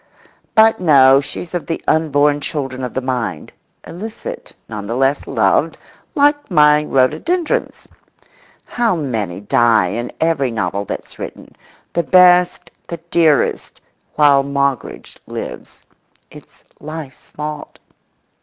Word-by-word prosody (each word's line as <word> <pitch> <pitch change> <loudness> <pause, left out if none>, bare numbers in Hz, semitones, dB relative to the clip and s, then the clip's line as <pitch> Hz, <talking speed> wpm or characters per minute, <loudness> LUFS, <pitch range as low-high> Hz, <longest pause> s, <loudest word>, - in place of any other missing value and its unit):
But 220 0 +5
no; 135 -6 +6
she's 170 +5 -7
of 175 - -4
the 165 - -3
unborn 145 -2 +2
children 135 -3 -4
of 125 - -5
the 130 - -1
mind, 125 -11 -4 0.3
illicit, 215 +6 -8
none 105 -2 -7
the 115 - -3
less 135 +2 0
loved, - - +1 0.4
like 290 -1 +2
my 150 -3 +4
rhododendrons. 155 - -1 0.8
How 235 -5 0
many 110 - -3
die 110 -2 +2
in 120 +5 -4
every 160 -5 +1
novel 100 -3 -3
that's - - -8
written—the 170 - -7
best, 180 0 +4 0.2
the 170 - -5
dearest, 160 -5 +1 0.4
while 145 -2 +5
Moggridge 140 -1 -3
lives. - - -8 0.5
It's - - -16 0.2
life's 155 -3 -9
fault. 150 0 -7
145 Hz, 115 wpm, -17 LUFS, 130-170 Hz, 0.8 s, no